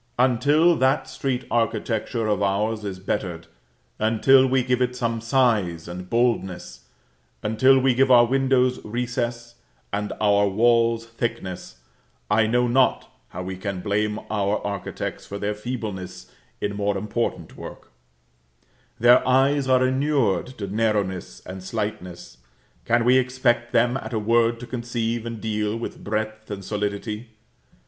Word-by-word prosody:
Until 145 +7 +4
that 130 +2 +2
street 130 -2 -3
architecture 115 0 -1
of 105 -2 0
ours 105 +2 0
is 100 -2 -4
bettered, 90 -3 -3 0.5
until 130 +5 +4
we 130 0 +2
give 125 0 0
it 125 0 0
some 115 -2 -2
size 110 -10 +1
and 90 +1 -7
boldness, 95 - -1 0.6
until 120 +5 +4
we 130 0 +3
give 130 +2 +3
our 120 -2 +7
windows 130 0 +1
recess, 120 +1 -3 0.4
and 105 0 -2
our 100 -1 +3
walls 115 +2 +2
thickness, 105 - -5 0.6
I 110 +1 +4
know 125 +2 +2
not 130 +2 +1
how 90 - -7
we 95 +1 -5
can 95 -1 -4
blame 105 +2 -1
our 105 0 +1
architects 100 -2 -5
for 100 - -6
their 105 +1 -2
feebleness 105 -5 -6 0.3
in 105 0 -2
more 100 -1 0
important 105 +4 -3
work; - - -10 1.1
their 120 +2 +6
eyes 135 +2 +3
are 130 0 +4
inured 130 - +1
to 100 - -4
narrowness 100 -2 -2
and 95 0 -8
slightness: 95 - -5 0.5
can 115 0 +2
we 130 +1 +6
expect 125 -2 0
them 120 +1 +2
at 115 -2 -7
a - - 0
word 115 +2 +2
to - - -6
conceive 120 -2 -3
and 115 -1 -5
deal 105 0 -2
with 115 - -7
breadth 110 +1 -3
and 100 -2 -6
solidity? 105 +2 -3
115 Hz, 140 wpm, -23 LUFS, 105-125 Hz, 1.1 s, our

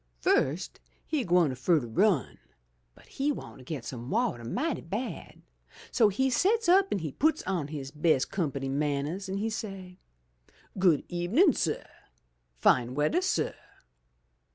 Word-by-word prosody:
"Fust 145 - +1 0.3
he 300 -5 -1
gwine 175 - +3
fur 130 +6 +2
ter 125 - -6
run, 165 - +1 0.6
but - - -19
he 280 +2 -1
want 275 - -8
to - - -12
get 130 -3 -6
some 120 0 -6
wateh 225 - 0
mighty 275 - -2
bad, 210 +10 -6 0.5
so 225 - +4
he 265 +7 +1
sets 400 - +2
up 380 +2 +5
an' - - +1
he 160 -5 -4
puts 310 - +1
on 180 -6 -2
his 140 -3 -6
best 150 -2 +1
company 140 -7 -2
man 140 0 0
nehs 190 +6 -5
an' 190 - -2
he 220 +3 -1
say, 195 -4 -7 0.8
*Good 175 -6 +4
ebenin', 210 - +3
suh! 160 -7 -1 0.7
Fine 120 - +3
weatheh, 150 - +2
suh!' 380 - 0
175 Hz, 155 wpm, -29 LUFS, 140-230 Hz, 0.8 s, up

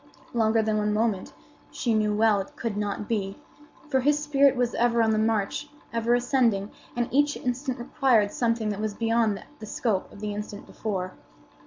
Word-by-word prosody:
Longer 225 -1 +3
than 215 0 +1
one 210 0 +1
moment 215 -4 0 0.4
she 240 - -2
well 215 0 +3
knew - - +1
it - - -22
could 230 -3 -3
not 205 0 -2
be; 200 -4 -2 0.5
for 270 -3 +2
his 290 +3 +3
spirit 280 -2 +3
was 245 -1 0
ever 235 -1 +3
on 220 - +3
the 215 - +2
march, 220 +5 0 0.2
ever 230 +1 +2
ascending, 240 -5 +1 0.2
and 240 0 0
each 290 +2 +3
instant 255 +1 -2
required 240 -5 +2
something 230 -2 0
that 205 0 -3
was 215 -1 -2
beyond 225 -2 +1 0.2
the 215 - -7
scope 210 -4 -1
of - - -12
the 210 0 -3
instant 205 0 -6
before. 185 -4 -4
225 Hz, 180 wpm, -26 LUFS, 210-245 Hz, 0.5 s, Longer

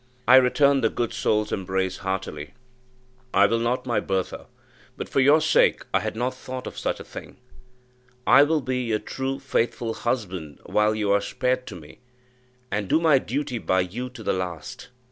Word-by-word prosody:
I 130 +2 +9
returned 135 +1 +4
the 115 - +4
good 120 0 -2
soul's 105 0 0
embrace 95 0 -2
heartily. 95 -4 -5 0.8
"I 100 +1 +6
will 115 +2 +1
not, 125 +2 -1
my 120 -4 +1
Bertha; 95 -2 -3 0.5
but - - -5
for - - 0
your 145 +4 +6
sake - - +3
I - - +4
had - - -4
not 125 +3 -1
thought 130 0 -7
of - - -7
such - - -2
a - - -7
thing. - - -10 0.9
I 135 +3 +7
will 155 +1 +3
be 130 -1 -2
your 115 -3 0
true, 135 +4 -4
faithful 120 -3 -1
husband 95 - -3
while 105 0 +2
you 105 -2 0
are 100 0 +3
spared 125 0 -1
to 100 - -7
me, 75 -4 -13 0.7
and 100 0 -1
do - - +4
my 160 -5 +4
duty 130 0 -3
by 95 -3 +1
you 115 +8 -4
to 125 -3 -11
the - - 0
last." 90 +5 -5
115 Hz, 185 wpm, -24 LUFS, 95-130 Hz, 0.9 s, I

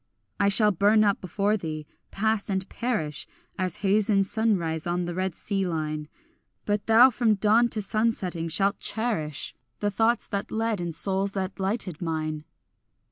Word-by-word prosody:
I 200 -1 +3
shall 210 +1 +5
burn 205 +4 +4
up 200 -2 +1
before 200 +3 0
thee, 155 -4 -5 0.2
pass 220 0 0
and 190 0 -2
perish, 165 - -2 0.3
As 185 -2 -1
haze 205 +2 +2
in 195 -2 +4
sunrise 185 -7 0
on 175 0 -1
the 175 - -4
red 185 -1 -2
sea 195 -2 -2
line; 155 -3 -3 0.6
But 205 0 -1
thou 235 +4 +7
from 225 -2 +2
dawn 220 +4 +3
to 215 -2 -2
sunsetting 195 -6 -1
shalt 195 +5 +1
cherish 170 - -1 0.3
The 205 0 0
thoughts 225 +4 +1
that 200 -1 -3
led 220 -3 -1
and 170 -2 -4
souls 195 +2 +1
that 190 0 -4
lighted 190 -4 -2
mine. 155 -2 -3
195 Hz, 160 wpm, -26 LUFS, 175-215 Hz, 0.6 s, thou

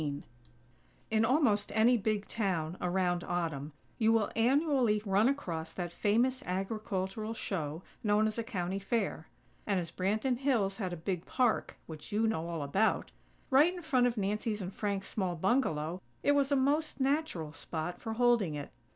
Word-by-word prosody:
XIV 145 -1 -3 0.9
In 220 0 +3
almost 230 -6 +2
any 230 +3 +5
big 215 -2 -1
town, 180 -7 -1
around 180 -1 +1
Autumn, 160 -5 -2 0.3
you 225 -1 +4
will 225 -2 +2
annually 255 -2 +3
run 200 +4 +4
across 165 - -3
that 175 -2 -4
famous 240 +8 +2
agricultural 195 +2 -3
show 165 -5 -3 0.2
known 210 0 +3
as 220 +1 -1
a - - -1
County 190 -4 -3
Fair; 200 -5 -2 0.4
and, 200 -3 +2
as 170 -2 -5
Branton 215 +8 0
Hills 230 -8 +1
had 190 -5 -3
a 175 - -4
big 175 +1 -3
park, 245 -4 +1
which 155 +4 -9
you 215 +2 +2
know 170 -7 0
all 165 -3 -3
about, 195 +10 +1 0.4
right 290 +6 +6
in 350 - -8
front 255 -6 +3
of 240 -1 -2
Nancy's 210 +2 -1
and 190 -1 -5
Frank's 200 -2 -2
small 185 -4 -2
bungalow, 175 - 0 0.2
it - - +4
was 285 -1 +2
a - - +5
most 285 +3 +1
natural 265 - 0
spot 165 +2 -5
for 225 - -3
holding 235 -8 +3
it. 145 -1 -6
205 Hz, 170 wpm, -32 LUFS, 175-240 Hz, 0.9 s, right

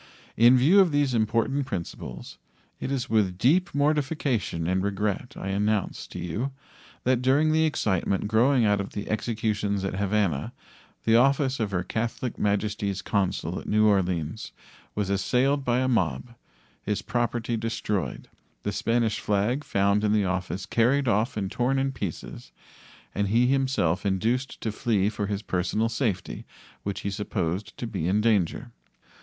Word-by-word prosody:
In 120 +3 +6
view 155 +11 +5
of 185 -4 +5
these 145 -3 +1
important 115 +5 +1
principles, 85 - -6 0.4
it - - -4
is 130 -2 -1
with 100 -6 +1
deep 165 - +2
mortification 140 - 0
and 95 +2 +1
regret 100 +3 -2
I 95 - -4
announce 105 +1 -1
to - - -9
you 115 +11 -3 0.5
that 125 -1 +2
during 140 +5 +3
the 160 +1 +3
excitement 100 - 0
growing 120 +3 +3
out 105 -1 +2
of 100 - -7
the 105 - -5
executions 105 -3 -1
at 95 - -2
Havana 100 -7 0 0.5
the 115 0 +4
office 135 +1 +3
of 110 -3 0
Her 90 -3 -1
Catholic 115 +5 -3
Majesty's 105 -1 -1
consul 95 -4 -1
at - - -11
New 110 0 +3
Orleans 95 -2 0 0.4
was 100 -1 -1
assailed 130 +8 +1
by 120 -2 +1
a 130 0 +1
mob, 105 - 0 0.5
his 105 -1 -2
property 120 -1 -1
destroyed, 110 - -3 0.4
the - - -1
Spanish 115 -2 0
flag 105 +8 0
found 100 -1 +1
in 105 0 +2
the 105 -2 +2
office 95 0 -2
carried 130 +4 +2
off 110 0 +1
and 95 -2 -2
torn 125 +3 +1
in 135 0 +1
pieces, 100 - -6 0.6
and 100 0 0
he 115 +5 +3
himself 130 -10 +1
induced 115 +7 -1
to 110 - -2
flee 105 -2 +1
for 105 -2 -3
his 100 +1 -3
personal 95 +4 0
safety, 115 -7 -2 0.4
which 100 -1 -4
he 100 - -3
supposed 95 -1 -3
to - - -4
be 95 -8 -3
in 100 +3 +2
danger. 110 +1 +1
110 Hz, 155 wpm, -26 LUFS, 100-125 Hz, 0.6 s, In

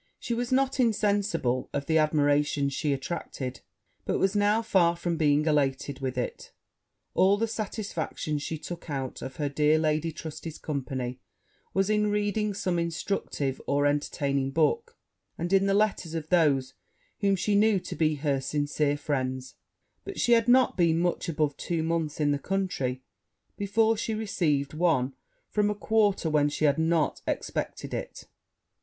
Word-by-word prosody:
She 240 - -3
was 240 +1 -2
not 270 +1 +2
insensible 205 - +1
of 140 0 -2
the 160 +1 +3
admiration 145 -2 +2
she 145 +2 -1
attracted; 135 -2 -4 0.4
but - - 0
was 195 +1 +1
now 205 +2 +3
far 175 -6 +3
from 170 0 -2
being 150 -2 +3
elated 140 -2 0
with 130 -2 -3
it: 125 - -4 0.6
all 195 +2 +4
the 225 +2 0
satisfaction 200 -8 -3
she 160 +2 -4
took 170 +2 -8
out 135 -3 -4
of 130 - -6
her 145 - -1
dear 150 +2 +3
Lady 155 +1 0
Trusty's 160 0 -7
company 130 -3 -4 0.6
was 195 0 +2
in 210 0 +2
reading 210 0 0
some 180 -3 0
instructive 160 -5 -2
or 145 0 +2
entertaining 140 -1 0
book, 455 - 0 0.4
and 175 +3 -2
in 195 0 +4
the 195 - +2
letters 200 -6 +1
of 160 -1 -4
those 145 -7 +3 0.5
whom 200 -2 +3
she 205 +3 0
knew 205 0 +4
to - - -6
be 155 -1 +2
her 140 -2 0
sincere 145 +1 0
friends; 130 -3 -2 0.5
but 395 - -7
she 240 - +2
had 230 0 +5
not 255 +1 +5
been 165 -2 +3
much 175 0 0
above 150 -3 0
two 165 -2 -2
months 160 -2 -1
in 145 -1 +2
the 145 - 0
country 140 -10 -2 0.5
before 220 +3 +2
she 220 0 -2
received 165 -10 0
one 155 -6 +1 0.3
from 210 -1 +1
a 210 - -1
quarter 205 -4 +2
whence 145 -2 +2
she 155 - 0
had 145 +1 +3
not 160 -1 +1
expected - - -3
it. - - -5
160 Hz, 160 wpm, -28 LUFS, 145-200 Hz, 0.6 s, had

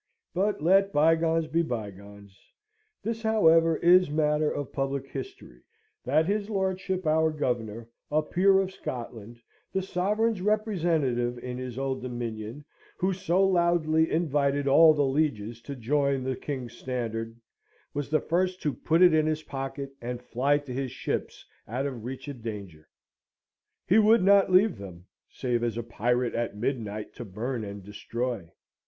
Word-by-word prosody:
But 195 -2 0
let 195 +3 +4
bygones 165 +1 +3
be 160 +2 +1
bygones. 100 - -7 0.7
This, 225 0 -3
however, 165 -7 +4
is 180 0 +5
matter 150 0 +1
of 145 -2 -5
public 135 0 -2
history, 390 - -9 0.4
that 160 - +2
his 205 +3 -1
lordship, 190 -2 -1
our 160 +1 +3
Governor, 120 -7 -3 0.2
a 155 +1 +2
peer 190 +5 +3
of 190 -1 -1
Scotland, 120 - -7 0.3
the 190 - -1
Sovereign's 205 +3 0
representative 165 - 0
in 125 +1 -6
his 125 -1 -6
Old 135 -1 -2
Dominion, 120 +1 -5 0.3
who 190 +1 +1
so 185 0 +1
loudly 170 -3 +2
invited 145 -3 +1
all 155 +3 +7
the 145 -1 +2
lieges 130 -6 -1
to 140 +3 -7
join 140 +2 0
the 130 0 -2
King's 125 -3 -5
standard, 115 -2 -4 0.5
was 145 -1 -3
the 155 +1 +3
first 185 +2 0
to 150 -3 0
put 165 +3 +2
it 175 -2 +7
in 155 0 +3
his 155 0 -1
pocket, 135 0 -5
and 120 +1 -5
fly 135 +5 +1
to 145 -3 -7
his 135 0 -2
ships - - -4 0.2
out 125 +5 -2
of 130 -6 -5
reach 130 +3 -7
of 140 -5 -7
danger. 100 -9 -8 1.0
He 195 +5 +5
would 220 0 +5
not 200 0 +5
leave 185 - +4
them, 90 -3 -10 0.2
save 120 -2 -2
as 115 -2 -1
a 120 - -2
pirate 120 +2 0
at 115 -3 -2
midnight 110 -3 -3
to - - -7
burn 115 +4 -4
and 100 -1 -7
destroy. 105 -1 -4
140 Hz, 155 wpm, -27 LUFS, 120-170 Hz, 1.0 s, all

